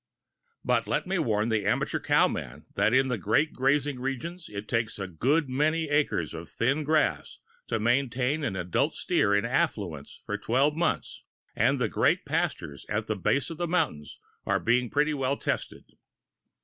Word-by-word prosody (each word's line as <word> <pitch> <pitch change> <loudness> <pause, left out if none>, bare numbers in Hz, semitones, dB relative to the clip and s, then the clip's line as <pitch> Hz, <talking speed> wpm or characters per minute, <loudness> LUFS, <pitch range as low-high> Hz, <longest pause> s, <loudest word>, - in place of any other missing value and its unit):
But - - +1
let - - 0
me 185 0 -1
warn 110 -6 +1
the 110 -2 +1
amateur 105 - 0
cow - - +3
man - - -6
that 110 - +2
in 130 +2 +4
the 125 -4 -2
great 115 - +1
grazing 135 0 +1
regions 160 +7 -5
it 105 +1 -7
takes 115 -2 -1
a 100 - -3
good 135 - +1
many 155 +4 0
acres 145 - +1
of 80 0 -8
thin 140 +6 0
grass 155 0 0 0.3
to 115 - -1
maintain 125 +4 +1
the 95 -10 -2
adult 90 -1 0
steer 100 - +2
in 100 - +1
affluence 105 - -2
for - - -3
twelve 135 +6 +2
months, 170 0 -1 0.3
and - - +3
the - - +1
great - - +1
pastures 70 0 -2
at 105 +1 -1
the 110 - -2
base 135 - 0
of 165 - -7
the 175 - -1
mountains 155 - -1 0.3
are - - +1
being 120 +1 +1
pretty 150 +4 +1
well 135 -1 0
tested. - - -3
130 Hz, 175 wpm, -27 LUFS, 105-150 Hz, 0.3 s, in